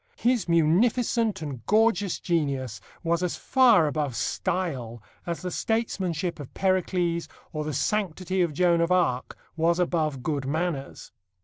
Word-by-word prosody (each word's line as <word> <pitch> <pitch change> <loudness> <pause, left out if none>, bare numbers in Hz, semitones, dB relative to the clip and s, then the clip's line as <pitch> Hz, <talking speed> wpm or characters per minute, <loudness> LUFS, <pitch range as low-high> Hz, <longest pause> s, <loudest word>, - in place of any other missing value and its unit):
His 240 -6 +1
munificent 210 +5 +2
and 135 -6 -6
gorgeous 210 -3 +3
genius 135 - -1 0.2
was 170 +1 +1
as 180 -2 -1
far 245 -10 +4
above 145 -4 -1
style 125 - -2 0.2
as 170 +1 -3
the 180 - -3
statesmanship 185 -8 -1
of 145 - -8
Pericles 180 -3 0 0.3
or 155 -1 -2
the 155 - -3
sanctity 185 +2 -1
of 170 -3 +1
Joan 170 +2 +3
of 170 +2 +1
Arc 150 -9 +1 0.2
was 170 +1 +2
above 155 -7 0
good 140 -3 -2
manners. 155 -2 -3
170 Hz, 135 wpm, -26 LUFS, 150-185 Hz, 0.3 s, far